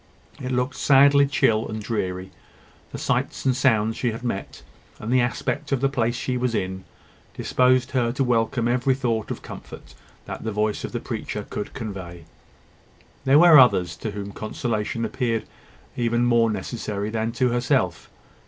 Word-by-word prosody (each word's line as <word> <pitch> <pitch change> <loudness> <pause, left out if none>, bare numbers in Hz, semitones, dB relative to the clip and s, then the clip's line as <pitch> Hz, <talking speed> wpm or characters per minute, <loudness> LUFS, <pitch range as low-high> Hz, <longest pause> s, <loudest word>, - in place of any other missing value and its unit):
It 130 0 -4
looked 125 +1 -1
sadly 140 0 +5
chill 115 -6 +2
and 110 0 -5
dreary. 95 -4 -3 0.6
The - - -6
sights - - -1
and 130 -2 +3
sounds 115 -4 +2
she 125 - -1
had 115 +2 -6
met, 110 -5 -4 0.3
and 115 +4 -3
the 130 - +5
aspect 120 +3 -2
of 135 - +2
the 135 +2 +2
place 120 -3 0
she 125 +1 -2
was 125 -2 -1
in, 95 -1 -3 0.5
disposed 125 0 +2
her 120 -3 +1
to 135 - 0
welcome 120 0 +1
every 125 +2 +2
thought 115 -5 -1
of - - -5
comfort - - -10 0.3
that - - -7
the 110 - -2
voice 105 0 -1
of - - -5
the - - -3
preacher - - -5
could 105 - -6
convey. 95 -7 -7 1.0
There 135 +2 +6
were 165 -2 +9
others 90 -9 +4
to 110 - -4
whom 100 -1 -6
consolation 110 +1 -3
appeared 115 -3 -1 0.5
even 120 0 +1
more 120 -1 +3
necessary 105 0 -4
than 110 0 -1
to 125 +1 +1
herself. 120 0 0
115 Hz, 165 wpm, -24 LUFS, 105-125 Hz, 1.0 s, were